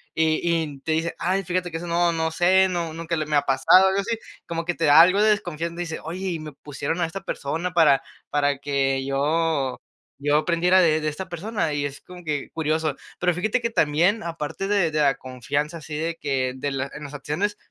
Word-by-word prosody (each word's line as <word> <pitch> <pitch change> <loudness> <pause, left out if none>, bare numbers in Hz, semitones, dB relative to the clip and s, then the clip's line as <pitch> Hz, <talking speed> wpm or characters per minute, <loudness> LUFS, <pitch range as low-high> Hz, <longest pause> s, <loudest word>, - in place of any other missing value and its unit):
y 160 -1 +2
y 165 -4 -1
te 160 - -3
dice: 165 +1 -1
"Ay, 190 +3 0
fíjate 180 0 -2
que 165 - -3
eso 175 - -6
no, 170 0 +2
no 160 -1 -1
sé, 190 +3 +4
no, 170 -3 -2
nunca 165 +1 -3
le 155 -1 -1
me 150 - 0
ha 145 - +2
pasado 185 +7 +5
algo 190 +1 +1
así", 225 +3 -2 0.3
como 165 0 -3
que 175 - 0
te 165 - -4
da 145 +2 +7
algo 185 +5 +6
de 215 - +5
desconfianza 170 -5 -1
y - - -13
dice: 160 - -5
"Oye, 180 +4 -5
y 165 - -3
me 155 -1 -7
pusieron 145 +4 -4
a - - +3
esta 165 +4 -6
persona 165 +5 -3
para 150 -5 +5 0.3
para 145 -1 +1
que 135 -1 0
yo 145 0 0 0.4
yo 145 +1 +1
aprendiera 180 +3 +3
de 155 -2 +3
de 155 - -2
esta 170 +6 -7
persona" 185 0 -2
y 145 0 -1
es 140 0 -6
como 180 -1 -12
que 150 -2 -2
curioso. 155 -2 -1 0.2
Pero 180 0 +2
fíjate 215 +7 0
que 235 - 0
también, 175 +4 +2
aparte 165 +3 -4
de 200 -6 +2
de 155 - -1
la 140 -2 +3
confianza 140 +5 -3
así 155 -1 -8
de 165 +2 -2
que 130 -3 -1
de 140 +2 -2
la 135 0 -3
en 150 - -8
las 145 - -9
acciones, 155 +9 -2
160 Hz, 225 wpm, -24 LUFS, 145-175 Hz, 0.4 s, da